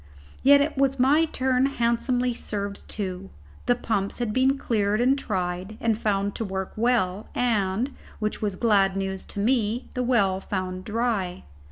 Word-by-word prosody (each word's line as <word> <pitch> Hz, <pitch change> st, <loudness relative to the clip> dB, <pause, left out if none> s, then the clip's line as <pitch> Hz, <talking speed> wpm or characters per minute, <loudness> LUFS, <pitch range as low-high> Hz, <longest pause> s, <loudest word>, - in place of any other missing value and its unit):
Yet 285 Hz, +2 st, +5 dB
was 275 Hz, 0 st, +2 dB
my 290 Hz, +6 st, +5 dB
turn 260 Hz, -3 st, +1 dB
handsomely 245 Hz, 0 st, 0 dB
served 200 Hz, -3 st, -5 dB
too. 190 Hz, -2 st, -4 dB, 0.4 s
The 245 Hz, -, +4 dB
pumps 205 Hz, -5 st, -2 dB
had 235 Hz, -3 st, -2 dB
been 265 Hz, +3 st, +3 dB
cleared 210 Hz, -5 st, 0 dB
and 255 Hz, +3 st, +4 dB
tried, 185 Hz, -4 st, -3 dB
and 230 Hz, -1 st, +1 dB
found 200 Hz, -2 st, 0 dB
to -, -, -2 dB
work 190 Hz, -2 st, -4 dB
well, 215 Hz, -4 st, +1 dB
and 225 Hz, +1 st, 0 dB, 0.2 s
which 215 Hz, 0 st, -3 dB
was 205 Hz, -3 st, -1 dB
glad 195 Hz, -3 st, +3 dB
news 190 Hz, -1 st, -3 dB
to -, -, -7 dB
me 230 Hz, +1 st, +1 dB
the 250 Hz, -, -1 dB
well 205 Hz, -7 st, +2 dB
found 185 Hz, -1 st, -4 dB
dry. 215 Hz, -5 st, -1 dB
215 Hz, 155 wpm, -25 LUFS, 195-250 Hz, 0.4 s, Yet